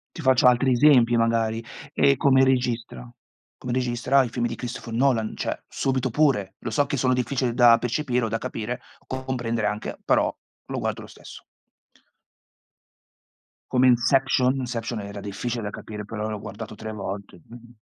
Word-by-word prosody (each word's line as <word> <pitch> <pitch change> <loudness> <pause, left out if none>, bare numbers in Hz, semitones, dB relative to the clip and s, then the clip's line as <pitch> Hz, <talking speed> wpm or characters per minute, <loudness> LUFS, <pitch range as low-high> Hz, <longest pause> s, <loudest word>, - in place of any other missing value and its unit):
Ti 165 - -7
faccio 130 -2 +4
altri 125 +1 +3
esempi 120 -3 +5
magari, 115 -1 +1 0.3
ehm, 140 0 +4
come 135 0 +4
registra. 120 - -1 0.5
Come 125 - -5
registra 125 +2 +2
i - - -4
film 120 +1 -2
di 115 - -3
Christopher 125 -1 -6
Nolan, 115 -3 +1
cioè - - -2
subito 130 -2 -1
pure, 115 -9 +1
lo - - -5
so 145 -1 +1
che 140 - -2
sono 130 0 +2
difficili 125 0 0
da 120 -2 +7
percepire 125 0 -1
o - - -1
da 115 - -2
capire, 120 +3 -5 0.3
comprendere 120 -4 -2
anche, 105 +1 -4
però - - +2 0.3
lo - - -4
guardo - - -3
lo - - -10
stesso. - - -13 2.3
Come 130 0 +4
Inception. 130 +1 +3
Inception 120 -2 -3
era 100 0 -7
difficile 115 +4 -4
da 105 - -4
capire, 105 0 -8
però 105 +1 -4
l'ho 105 -1 -4
guardato 110 +3 -8
3 110 +1 -7
volte. 100 -3 -7
Mh. 120 0 -14
120 Hz, 160 wpm, -24 LUFS, 110-130 Hz, 2.3 s, da